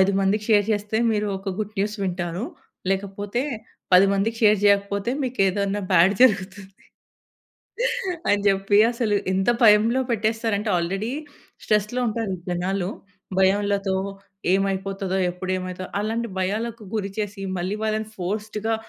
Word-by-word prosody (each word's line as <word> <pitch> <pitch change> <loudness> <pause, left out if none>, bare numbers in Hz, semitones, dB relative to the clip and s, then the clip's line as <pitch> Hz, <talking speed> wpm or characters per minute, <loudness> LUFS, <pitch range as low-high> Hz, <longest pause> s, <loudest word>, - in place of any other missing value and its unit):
5 190 +1 +4
మందికి 200 +2 +1
షేర్ 205 -2 +5
చేస్తే 210 +1 -2
మీరొక 205 -2 -2
గుడ్ 215 0 -4
న్యూస్ 210 +2 0
వింటారు. 180 +1 -2 0.5
లేకపోతే 200 +4 -2 0.5
10 185 +2 +8
మందికి 210 +4 0
షేర్ 210 -1 +6
జేయకపోతే 200 +1 +2
మీకేదైనా 200 -5 0
బ్యాడ్ 180 +3 +5
జరుగుతుంది. 195 -4 +2 1.6
అని 205 0 +3
జెప్పి 195 +1 +3
అసలు 230 -3 0 0.2
ఎంత 190 +4 +2
భయంలో 220 +3 +5
పెట్టేస్తారంటే 220 -1 0
ఆల్రెడీ 195 +6 -2 0.5
స్ట్రెస్‌లో 215 +4 +1
ఉంటారు 225 -2 -2
ఈ - - -14
జనాలు. 180 +1 -1 0.5
భయంలతో 200 0 +2 0.6
ఏమైపోతదో 195 0 -1
ఎప్పుడేమైతదో 185 0 -4
అలాంటి 225 +3 -2
భయాలకు 220 +5 -2
గురి 200 -2 -2
చేసి 205 -1 -3 0.2
మళ్ళీ 185 +4 -2
వాళ్ళని 215 0 -1
ఫోర్‌స్డ్‌గా 210 +4 -2
200 Hz, 120 wpm, -23 LUFS, 190-215 Hz, 1.6 s, 10